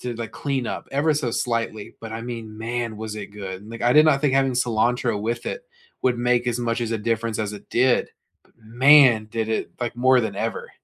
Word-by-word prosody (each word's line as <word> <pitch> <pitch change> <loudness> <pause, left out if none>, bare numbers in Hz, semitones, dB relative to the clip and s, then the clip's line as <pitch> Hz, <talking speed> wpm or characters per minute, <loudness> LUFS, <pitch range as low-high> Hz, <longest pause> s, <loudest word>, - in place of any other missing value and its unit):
to 125 -1 -4
the 115 -1 -5
clean 135 -4 -3
up - - -5
ever 145 +3 +2
so 145 -5 -1
slightly, 115 -3 -2
but 115 -1 -8
I 115 - -5
mean, 115 -3 -7
man, 115 -1 -3
was 110 0 -6
it 105 -2 -6
good 95 -2 -7
and 110 - -12
like 115 - -7
I 120 +1 +4
did 150 +1 +7
not 140 -3 +4
think 145 -3 +1
having 135 -1 +2
cilantro 120 -2 +1
with 120 +2 -3
it - - -4 0.4
would 125 -1 +2
make 125 0 +1
as 120 0 0
much 115 0 -1
as 115 -1 -2
a 115 - -1
difference 115 0 -1
as 105 -1 -3
it 105 - -11
did, 125 +1 +2 0.3
but - - -29
man, 120 0 +5
did 110 -1 -2
it 110 - -2
like 120 -1 -3
more 130 +1 +4
than 110 -3 -3
ever. 110 +2 -3
115 Hz, 235 wpm, -23 LUFS, 110-125 Hz, 0.4 s, did